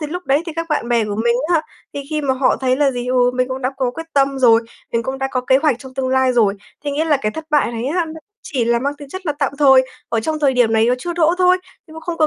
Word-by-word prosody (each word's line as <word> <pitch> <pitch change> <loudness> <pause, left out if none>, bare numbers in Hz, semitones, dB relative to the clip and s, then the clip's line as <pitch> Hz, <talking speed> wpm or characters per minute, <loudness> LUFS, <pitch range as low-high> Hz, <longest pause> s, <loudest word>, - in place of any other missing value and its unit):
thì 300 - -3
lúc 355 +4 -5
đấy 280 +4 +2
thì 330 - -4
các 330 - -2
bạn 295 -6 -1
bè 235 -2 +2
của 205 -1 -4
mình 235 - +3 0.2
á, 320 - +4 0.3
thì 285 - -3
khi 305 -1 -1
mà 270 -2 0
họ 260 0 +2
thấy 255 +1 0
là 285 0 +3
gì, 245 -1 -5
ừ, 250 -1 +3
mình 255 0 0
cũng 260 0 -5
đã 255 - 0
có 260 -2 0
quyết 325 +6 -8
tâm 275 -1 +1
rồi, 230 -3 +5 0.3
mình 230 - 0
cũng 265 +3 -4
đã 270 0 -1
có 255 - -1
kế 260 +1 +3
hoạch 280 -4 +1
trong 265 -1 -12
tương 260 -1 -2
lai 260 0 +2
rồi. 220 -5 +3 0.3
Thế 290 - -1
nghĩa 295 +3 0
là 310 -3 +3
cái 215 -6 -3
thất 320 - -7
bại 295 -5 +2
này 230 0 -4
á 340 +5 0
nó 315 - -8 0.3
chỉ 255 -5 -2
là 235 0 +2
mang 280 +3 -2
tính 285 -2 -10
chất 375 +5 -8
là 300 - +1
tạm 280 -2 0
thời, 265 -3 +6 0.3
ở 225 - 0
trong 310 +6 -2
thời 280 -3 +2
điểm 245 -3 +2
này 220 0 +3
nó 245 - +3
chưa 345 +7 -4
đỗ 335 0 +2
thôi, 365 0 +4 0.3
nhưng 315 - -14
mà 320 - -8
không 335 +1 -4
có 310 - +4
270 Hz, 320 wpm, -19 LUFS, 250-305 Hz, 0.3 s, thời